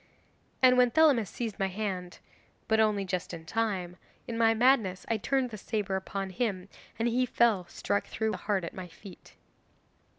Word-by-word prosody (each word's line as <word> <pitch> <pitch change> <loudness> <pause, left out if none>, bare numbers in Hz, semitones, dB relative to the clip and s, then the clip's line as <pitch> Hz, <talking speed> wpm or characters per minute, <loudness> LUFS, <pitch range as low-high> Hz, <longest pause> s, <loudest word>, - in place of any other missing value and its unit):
And 255 0 +7
when 250 -1 +5
Thelamis 275 - +4
seized 225 -4 -5
my 195 - +1
hand 185 -2 -4 0.5
(but 220 0 +2
only 210 -2 +2
just 180 -2 -3
in 160 -1 -11
time), 185 -3 -2 0.3
in 235 - -4
my 225 0 +3
madness 225 -6 +2
I 225 - +1
turned 255 +3 0
the 215 - -7
sabre 205 -2 -2
upon 190 0 -4
him, 190 -2 -2 0.3
and 230 - 0
he 245 +2 +2
fell 215 -8 +2
struck 200 - -2
through 220 -1 -1
the - - -3
heart 200 -3 -1
at 170 - -5
my 185 -1 -7
feet. 180 +2 -14
210 Hz, 175 wpm, -29 LUFS, 190-230 Hz, 0.5 s, And